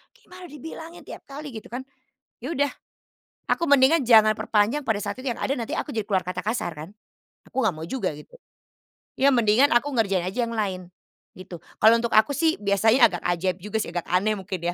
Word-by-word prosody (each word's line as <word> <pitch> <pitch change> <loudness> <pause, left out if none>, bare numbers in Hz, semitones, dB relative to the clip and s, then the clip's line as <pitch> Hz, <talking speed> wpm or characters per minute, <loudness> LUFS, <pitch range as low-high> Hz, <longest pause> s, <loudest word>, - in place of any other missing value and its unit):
"Gimana 365 -7 -13
dibilangin 320 +3 -10
tiap - - -11
kali!" 285 +1 -8
Gitu 220 -3 -9
kan, 245 +3 -6 0.5
ya 260 +7 -6
udah 285 -2 +1 0.8
aku - - 0
mendingan 285 +3 +5
jangan 220 -3 +6
perpanjang 225 +8 0
pada 220 -6 0
saat - - -4
itu 265 - -1
yang 235 - -7
ada 275 - -1
nanti 230 -4 -5
aku - - -3
jadi 220 - -1
keluar 190 -3 -1
kata 180 0 -4
kasar 215 -6 -2
kan. 155 +3 -9 0.6
Aku 265 - -2
nggak 220 - +3
mau 160 +1 -7
juga 215 -5 -2
gitu. 150 - -14 0.8
Ya 275 +1 +4
mendingan 240 +3 +3
aku 240 +4 +3
ngerjain 200 -5 +1
aja 215 +7 -1
yang 230 - -6
lain 185 -5 -3 0.4
gitu. 185 -1 -10 0.2
Kalau 225 +2 +7
untuk 235 0 -2
aku 220 +6 +4
sih 320 -5 +1
biasanya 215 +5 +4
agak 175 -2 -6
ajaib 175 +1 0
juga 210 +2 -2
sih, - - -3
agak 175 -1 -3
aneh 200 +4 +1
mungkin 190 -2 -6
220 Hz, 200 wpm, -24 LUFS, 190-265 Hz, 0.8 s, Kalau